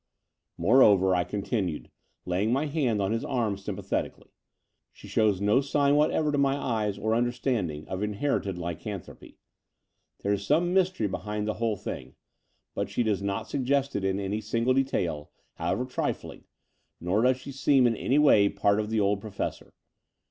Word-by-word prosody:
Moreover," 95 -1 +5
I 90 - +2
continued, 100 -4 -3 0.3
laying 95 +5 0
my 135 +5 +1
hand 140 -8 0
on 95 - -1
his 115 0 -1
arm 115 -6 -1
sympathetically, 100 0 -4 0.6
she - - -14
shows 105 -4 +2
no 105 +6 +3
signs 140 0 +2
what 150 +1 +4
ever 150 -1 0
to 145 - 0
my 135 -1 +3
eyes 110 -7 -1
or 110 +2 0
understanding 120 - -1
of 95 +1 -4
inherited 105 -2 -1
ly 85 0 -3
canthropy. 95 +3 -9 0.9
There 100 - +1
is 100 -1 -2
some 170 - +2
mystery 185 - +2
behind 105 +2 -4
the 110 - 0
whole 110 -3 0
thing: - - -7 0.6
but 100 0 -3
she 110 +4 0
does 105 -3 0
not 100 0 -3
suggest 140 +1 0
it 100 - -1
in 95 0 0
any 100 +2 -2
single 115 +4 +1
detail, 90 - -1 0.3
however 125 - -1
trifling, 125 - -4 0.5
nor 90 +5 0
does 125 +1 +3
she 140 - -9
seem 135 -1 +3
in 115 -1 +3
any 130 +6 0
way 110 -9 +5
part 100 +1 +1
of 105 0 -2
the 110 0 0
old 100 0 +1
Professor. 105 -2 -5
110 Hz, 170 wpm, -27 LUFS, 100-130 Hz, 0.9 s, Moreover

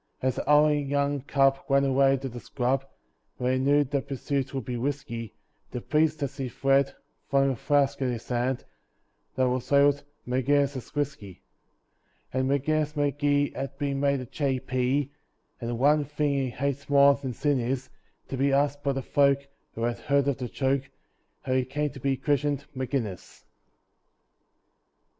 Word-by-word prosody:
As 130 -1 -1
the - - -1
howling 150 -1 +4
young 140 0 0
cub 135 0 +2
ran 140 0 +4
away 135 0 +4
to 135 +1 -5
the 120 -1 -7
scrub 130 +2 -1 0.5
Where 125 0 0
he 130 - +1
knew 145 +2 +4
that 140 0 -3
pursuit 140 0 -2
would 135 -4 -4
be 125 - -3
risky, 120 -4 -4 0.3
The 125 - -4
priest, 155 +3 +1
as 140 0 -4
he 135 -3 -3
fled, 135 +2 +2 0.3
flung 135 -1 +3
a - - -2
flask 140 +3 +1
at 130 - +1
his 120 -2 -5
head 125 +1 -1 0.7
That 130 -1 +2
was 125 +1 -2
labelled 140 0 +4 0.2
"Maginnis's 135 +1 0
Whisky"! 135 -11 -4 0.9
And 130 +1 0
Maginnis 150 +2 0
Magee 145 0 +1
has 135 - -4
been 140 -1 -1
made 140 -1 +1
a - - -6
J.P., 130 0 -1 0.5
And 115 - -4
the 120 - -1
one 145 +5 +4
thing 145 0 -1
he 135 -2 0
hates 140 +3 -3
more 140 0 +7
than 140 -2 -5
sin 145 +1 +1
is 130 +2 -2 0.4
To 135 - -3
be 140 +2 +2
asked 145 +1 +1
by 140 -1 0
the 135 0 -3
folk, 140 0 +2 0.3
who 115 - -3
have 120 0 -1
heard 140 -1 +1
of 140 -2 0
the 125 -2 -4
joke, 135 +1 0 0.5
How 130 - -1
he 130 0 +2
came 145 +3 -2
to 140 - -10
be 135 +1 0
christened 145 0 0
Maginnis! 125 - -4
135 Hz, 170 wpm, -27 LUFS, 130-145 Hz, 0.9 s, more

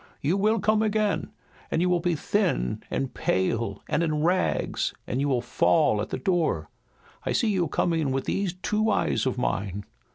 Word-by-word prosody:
You 155 +6 +1
will 215 +3 +2
come 215 +2 +2
again, 215 -1 0 0.4
and - - 0
you 180 - +2
will 180 -1 +2
be 175 0 0
thin 150 - 0
and 135 -1 -2
pale 100 +2 -1
and 165 - +1
in 155 -2 0
rags, 180 +2 0
and 125 - -2
you 145 - +1
will 125 -3 +1
fall 125 -2 +2
at 105 - -4
the - - -2
door. 175 -5 0 0.5
I - - -1
see 230 - +2
you 180 -4 +1
coming 160 -2 0
with 135 0 -1
these 195 -3 -1
two 215 +1 +1
eyes 200 - +1
of 130 - -1
mine." 100 -4 -2
165 Hz, 185 wpm, -26 LUFS, 125-195 Hz, 0.5 s, will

